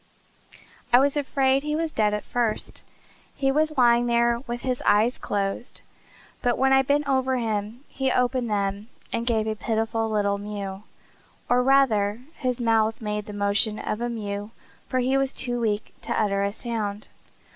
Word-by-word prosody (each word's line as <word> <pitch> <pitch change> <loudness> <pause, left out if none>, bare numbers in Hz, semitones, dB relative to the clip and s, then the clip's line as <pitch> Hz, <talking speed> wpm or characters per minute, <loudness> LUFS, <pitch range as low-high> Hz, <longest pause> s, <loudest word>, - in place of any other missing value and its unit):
I 245 - +8
was 275 +2 +3
afraid 270 -2 +2
he 300 +1 -2
was 325 0 -1
dead 215 -5 +2
at 210 0 -2
first. 235 -3 -2 0.5
He 270 -1 +1
was 310 +1 +1
lying 240 -1 +5
there 235 0 +2
with 240 0 -4
his 255 -1 -2
eyes 220 +4 +3
closed; 200 +3 -3 0.6
but 245 -1 +1
when 265 0 +3
I 270 - +6
bent 285 +2 +1
over 260 -1 +1
him 220 0 -2
he 265 -1 -1
opened 250 -1 +1
them 200 0 -1 0.3
and 230 +1 -2
gave 220 -3 +1
a 220 - -1
pitiful 225 0 -1
little 200 -2 +1
mew; 200 -2 -5 0.7
or 245 +1 +3
rather 240 -5 +3 0.2
his 255 -2 -1
mouth 225 -2 +2
made 210 -1 -3
the 210 - -7
motion 205 +2 +1
of 215 +1 -3
a 240 - -1
mew, 205 -2 -4 0.4
for 255 - 0
he 255 +2 +2
was 270 0 0
too 245 -1 -2
weak 215 -2 -1
to - - -2
utter 200 -2 +1
a 200 0 0
sound." 215 -2 -4
235 Hz, 170 wpm, -25 LUFS, 210-260 Hz, 0.7 s, I